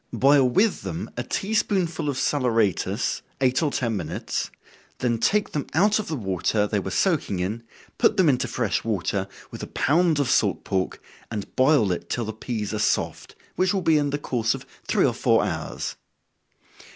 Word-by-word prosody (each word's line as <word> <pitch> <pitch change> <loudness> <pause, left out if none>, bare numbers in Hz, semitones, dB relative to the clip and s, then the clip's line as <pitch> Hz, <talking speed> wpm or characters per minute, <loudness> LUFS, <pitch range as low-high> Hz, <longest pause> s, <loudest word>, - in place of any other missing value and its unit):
Boil 135 -1 +5
with 200 - +2
them 170 +4 -5
a - - -2
tea 200 +3 -3
spoonful 175 -8 0
of 135 - -2
saleratus, 120 - +1 0.2
eight 130 +1 +2
or 155 - +2
ten 120 -5 -1
minutes, 90 -6 -3 0.5
then 120 -2 0
take 210 - +2
them 145 - -3
out 205 +6 +4
of 215 - -4
the 160 - -2
water 105 - 0
they 105 0 0
were 95 - -4
soaking 150 - +1
in, 100 +6 -2 0.4
put 225 -3 +4
them 185 -3 +5
into 125 -3 +2
fresh 115 -3 -1
water, 100 -2 -1 0.2
with - - -8
a - - -5
pound 165 +1 +2
of 140 - +1
salt 100 -8 +2
pork, 95 -2 -2 0.3
and 105 -3 -6
boil 130 -7 +4
it 90 - -4
till 120 - -1
the 110 - -4
peas 110 -1 -4
are 105 - -2
soft, 105 - -1 0.2
which 185 +2 +2
will 190 - -1
be 160 -2 +4
in 145 -1 0
the 145 - -1
course 120 -5 0
of - - -9 0.2
three - - +3
or - - +2
four - - +2
hours. - - -4
130 Hz, 190 wpm, -24 LUFS, 105-160 Hz, 0.5 s, Boil